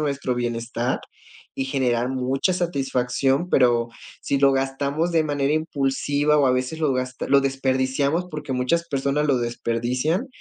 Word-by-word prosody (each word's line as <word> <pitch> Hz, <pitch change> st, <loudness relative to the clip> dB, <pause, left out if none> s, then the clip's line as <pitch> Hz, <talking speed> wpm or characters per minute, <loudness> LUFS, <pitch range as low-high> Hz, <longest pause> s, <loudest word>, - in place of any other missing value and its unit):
nuestro 140 Hz, -4 st, -1 dB
bienestar 120 Hz, +1 st, -2 dB, 0.6 s
y 135 Hz, -, -2 dB
generar 125 Hz, -2 st, 0 dB
mucha 130 Hz, +6 st, 0 dB
satisfacción, 135 Hz, -3 st, 0 dB
pero 120 Hz, -6 st, +3 dB, 0.3 s
si 140 Hz, -, -1 dB
lo 135 Hz, 0 st, +5 dB
gastamos 140 Hz, +5 st, -1 dB
de 160 Hz, -2 st, +2 dB
manera 145 Hz, -1 st, 0 dB
impulsiva 145 Hz, -1 st, 0 dB
o 145 Hz, -2 st, +4 dB
a 130 Hz, -, +3 dB
veces 130 Hz, +5 st, -2 dB
lo 150 Hz, -3 st, +2 dB
gasta 130 Hz, 0 st, -3 dB
lo 140 Hz, -, +5 dB
desperdiciamos 135 Hz, +4 st, 0 dB
porque 150 Hz, -2 st, -5 dB
muchas 130 Hz, +7 st, 0 dB
personas 140 Hz, +1 st, 0 dB
lo 135 Hz, -3 st, +2 dB
desperdician, 120 Hz, -, -1 dB
135 Hz, 145 wpm, -23 LUFS, 125-150 Hz, 0.6 s, lo